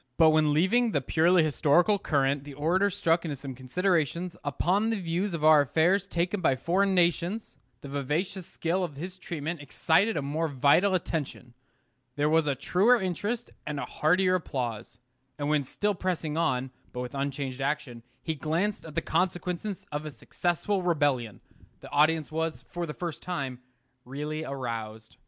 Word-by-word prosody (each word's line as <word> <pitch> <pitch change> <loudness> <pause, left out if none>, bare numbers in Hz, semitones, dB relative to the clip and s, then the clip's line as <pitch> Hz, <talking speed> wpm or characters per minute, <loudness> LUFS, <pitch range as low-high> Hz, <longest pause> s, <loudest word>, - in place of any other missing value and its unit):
But 160 -1 +6
when 155 -1 +3
leaving 210 +10 +3
the 145 - +3
purely 165 +5 +3
historical 165 +6 +3
current 140 -5 +1
the 145 -1 -10
orator 175 +8 +2
struck 170 -2 +1
into 155 -4 -3
some 135 0 -7
considerations 170 +5 -1
upon 185 +9 +1
the 225 -2 0
views 175 +2 -1
of 155 - -5
our 155 -1 +7
affairs 175 +8 +2
taken 180 +2 -1
by 135 -6 +3
foreign 190 +7 +1
nations, 175 +4 0 0.2
the - - -8
vivacious 155 +7 -2
skill 175 +3 -1
of 160 -5 -4
his 180 +5 -7
treatment 165 -2 -4
excited 165 +8 +2
a 145 - -1
more 155 +4 -1
vital 150 +8 +3
attention. 150 -8 -3 0.6
There 145 +1 +1
was 160 -1 +3
a 140 - +1
truer 215 - +3
interest 205 +6 -3 0.2
and 150 -1 -3
a - - -3
heartier 185 +4 +2
applause. 120 - -3 0.4
And 145 -1 -2
when 150 -1 +2
still 205 +10 -1
pressing 175 -5 -2
on, 130 -5 0 0.2
but 125 - -4
with 125 +1 -6
unchanged 140 -1 -3
action, 140 -4 -2 0.2
he 160 - -1
glanced 165 +6 -2
at 155 - -11
the - - +1
consequences 180 +3 -2
of 150 +1 -3
a - - -3
successful 175 - -1
rebellion, 145 - 0 0.4
the - - -11
audience 155 +1 +3
was, 160 0 -2
for 175 -1 -3
the 150 - -5
first 170 -4 -5
time, 135 -8 -4 0.5
really 150 +4 -4
aroused. 115 -5 -5
160 Hz, 165 wpm, -28 LUFS, 140-180 Hz, 0.6 s, our